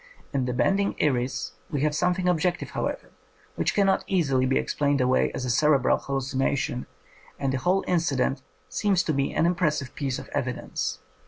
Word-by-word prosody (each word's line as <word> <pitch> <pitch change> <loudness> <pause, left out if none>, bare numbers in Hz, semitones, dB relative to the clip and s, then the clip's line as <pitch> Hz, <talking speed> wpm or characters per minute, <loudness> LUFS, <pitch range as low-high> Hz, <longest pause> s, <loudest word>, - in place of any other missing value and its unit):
In 135 -2 +1
the 125 - -1
bending 195 +11 +1
iris 130 -2 0 0.2
we 145 - -2
have 150 0 +2
something 180 +3 +1
objective, 175 0 0
however, - - -3 0.4
which - - 0
cannot 195 -2 +3
easily 135 -9 +2
be 135 - +2
explained 145 -1 +1
away 130 0 +2
as 130 - -3
a - - -2
cerebral 145 +2 +3
hallucination, 135 -1 -1 0.5
and 135 -2 -1
the 130 - 0
whole 185 +6 +2
inci 165 -6 0
dent 130 +1 0 0.3
seems 195 -3 +1
to 160 - 0
me 140 -1 0
an - - +3
impressive 155 -6 0
piece 135 -3 -2
of - - -8
evi - - -1
dence. - - -3
140 Hz, 175 wpm, -26 LUFS, 130-175 Hz, 0.5 s, cannot